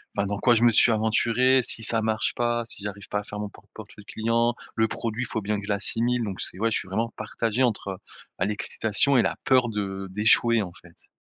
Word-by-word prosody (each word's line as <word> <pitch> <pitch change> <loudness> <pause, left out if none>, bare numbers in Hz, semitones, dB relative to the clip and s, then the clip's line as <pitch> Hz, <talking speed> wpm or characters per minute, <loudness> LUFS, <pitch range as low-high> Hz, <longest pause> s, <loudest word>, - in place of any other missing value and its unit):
ben 100 - 0
dans 100 0 -4
quoi 120 +1 +4
je 115 - +1
me 120 - +6
suis 115 +2 +5
aventuré? 115 +4 +2
Si 115 - +5
ça 115 +1 +3
marche 110 0 0
pas? 120 0 -1
Si 110 - -4
j'arrive 100 0 -7
pas 105 - -1
à - - -7
faire 105 0 -8
mon 105 0 -4
propre - - -20
portefeuille 105 - -12
client? 115 +2 0 0.2
Le 110 0 +2
produit, 115 +2 -4
faut 110 - -4
bien 105 +1 -2
que 100 - -8
je - - -10
l'assimile. 115 +4 +1
Donc 100 -4 -5
c'est - - -5
ouais, 115 +1 0
je - - +1
suis - - -9
vraiment 110 +5 -2
partagé 110 +2 -2
entre, 100 -6 -2 0.4
bah, 90 - +1
l'excitation 105 +5 +1
et - - +5
la - - -1
peur 130 -4 +3
de 95 -2 -4
d'échouer 110 +3 +3
en 90 - -8
fait. 90 -3 -16
110 Hz, 235 wpm, -25 LUFS, 105-120 Hz, 0.4 s, me